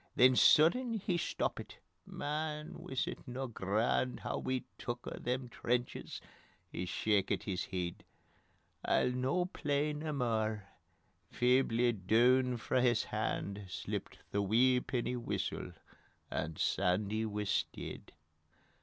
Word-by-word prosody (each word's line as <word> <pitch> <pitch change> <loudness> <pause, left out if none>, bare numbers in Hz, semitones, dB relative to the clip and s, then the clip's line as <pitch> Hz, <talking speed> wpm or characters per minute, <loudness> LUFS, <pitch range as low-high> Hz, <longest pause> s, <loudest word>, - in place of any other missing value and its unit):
Then 130 +1 +6
sudden 230 - +5
he 190 -4 -1
stoppit: 170 - -2 0.3
"Man, 150 +1 -3
wis 130 - -2
it - - -7
no 130 +2 -3
grand 115 +3 0
Hoo - - -2
we 130 -1 -1 0.2
took 120 0 -4
a' - - -6
them 125 +1 -2
trenches?"... 120 +1 -2 0.5
He 90 - -4
shakit 100 +1 +1
his 95 -4 -3
heid: 90 -2 -4 0.8
"I'll 125 - +2
no 130 +8 +1
play 150 -5 -1
nae 155 +1 -3
mair 110 -6 -1 0.3
" - - -41
feebly 125 -1 +4
doon 120 +5 +3
frae 125 +2 +1
his 120 -2 +3
hand 100 0 -3
Slipped 95 0 -5
the 100 - +1
wee 125 +6 +4
penny 125 0 -2
whistle 120 - -3 0.6
and 80 0 -2
_SANDY 100 +6 +1
WIS 105 -1 0
DEID. - - -8
125 Hz, 125 wpm, -34 LUFS, 105-130 Hz, 0.8 s, Then